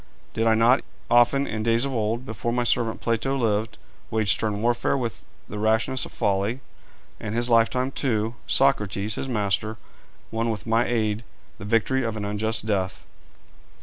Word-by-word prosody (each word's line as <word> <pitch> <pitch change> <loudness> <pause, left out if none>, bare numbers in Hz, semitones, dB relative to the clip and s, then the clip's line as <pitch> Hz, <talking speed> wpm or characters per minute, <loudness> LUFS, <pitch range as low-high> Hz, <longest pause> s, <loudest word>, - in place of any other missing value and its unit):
Did 115 +1 0
I 110 - +5
not 120 +4 +4 0.3
often 120 +4 +5
in 110 -4 -3
days 115 +3 +3
of 135 - -3
old, 115 +2 -1
before 110 0 -3
my 120 0 +1
servant 115 -1 +1
Plato 115 +4 0
lived, 110 -3 0 0.3
wage 110 -3 +2
stern 105 -1 0
warfare 120 +3 +1
with 120 -6 -4 0.2
the 105 - -6
rashness 110 +5 +2
of - - -15
folly? 100 +6 0 0.6
In 105 - -5
his 120 +1 +1
lifetime, 125 +3 +3
too, 115 -5 -1
Socrates, 105 -6 +1
his 135 - -4
master, 105 -1 -1 0.5
won 115 +1 -1
with 110 -2 -4
my 115 +1 +2
aid 110 -2 0 0.4
the 100 - -7
victory 115 +5 +1
of 115 -2 -2
an 105 - -3
unjust 110 +2 -1
death. 95 -3 -2
115 Hz, 165 wpm, -25 LUFS, 105-120 Hz, 0.6 s, I